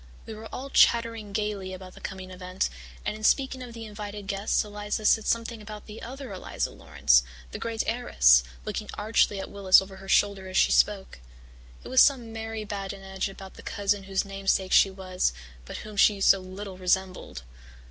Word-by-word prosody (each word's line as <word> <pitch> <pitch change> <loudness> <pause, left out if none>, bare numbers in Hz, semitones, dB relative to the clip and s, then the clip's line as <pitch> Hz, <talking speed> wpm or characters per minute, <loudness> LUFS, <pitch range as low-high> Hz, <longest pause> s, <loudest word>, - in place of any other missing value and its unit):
We 225 - -7
were 220 +1 -9
all 270 +2 -6
chattering 230 -3 +3
gaily 200 -2 -3
about 185 0 -11
the - - -14
coming 185 -1 -7
event, 185 0 -3 0.3
and 210 - -1
in 215 - -10
speaking 265 +2 +2
of 245 -2 -8
the 225 -1 -7
invited 205 -1 -7
guests 200 +1 0
Eliza 210 +1 -4
said 220 0 +4
something 230 -1 -1
about 210 0 -9
the 215 +1 -10
other 260 -2 -7
Eliza 185 - -3
Laurance, 70 -5 +3 0.3
the - - -6
great 230 -1 -2
heiress, 65 - +4 0.2
looking - - -4
archly 210 -1 +1
at - - -6
Willis 195 -2 +6
over 190 0 -8
her 195 0 -11
shoulder 200 -2 +2
as 185 - -2
she - - +4
spoke. 195 - +2 0.6
It - - -9
was 260 - +6
some 245 -5 +3
merry 225 -1 -5
badinage 195 -1 -4
about 195 0 -11
the - - -12
cousin 200 -1 -1
whose 195 +1 -1
namesake 195 -1 -1
she 195 - +6
was 185 - -1 0.3
but - - -7
whom 215 -1 -9
she 200 0 +5
so 195 0 +5
little 185 +1 -8
resembled. 185 - -1
200 Hz, 185 wpm, -27 LUFS, 190-220 Hz, 0.6 s, Willis